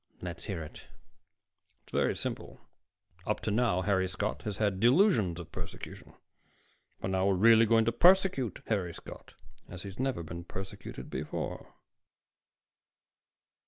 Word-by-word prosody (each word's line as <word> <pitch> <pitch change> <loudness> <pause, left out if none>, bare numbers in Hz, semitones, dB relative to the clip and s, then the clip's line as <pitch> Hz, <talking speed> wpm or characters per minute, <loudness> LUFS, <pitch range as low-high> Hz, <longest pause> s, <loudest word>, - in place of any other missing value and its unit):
"Let's 90 -1 -7
hear 95 -6 -4
it." 75 - -11 1.0
"It's - - -21
very - - +1
simple. - - -5 0.7
Up - - 0
to 110 - -1
now, 105 -5 +2
Harry 95 -1 +2
Scott 105 +3 -3
has 105 -3 -3
had 100 -3 0
delusions 120 - +4
of 85 -1 -9
persecution. 85 -2 -8 0.8
But 95 - -3
now 95 0 +2
we're 100 - +3
really 115 +3 +6
going 115 0 +4
to 115 - +2
persecute 175 - +4
Harry 95 -6 -1
Scott, - - -11 0.3
as 90 0 -8
he's 100 +1 -9
never 130 -9 -1
been 85 +2 -7
persecuted 95 -8 -8
before." - - -5
100 Hz, 135 wpm, -31 LUFS, 90-115 Hz, 1.0 s, really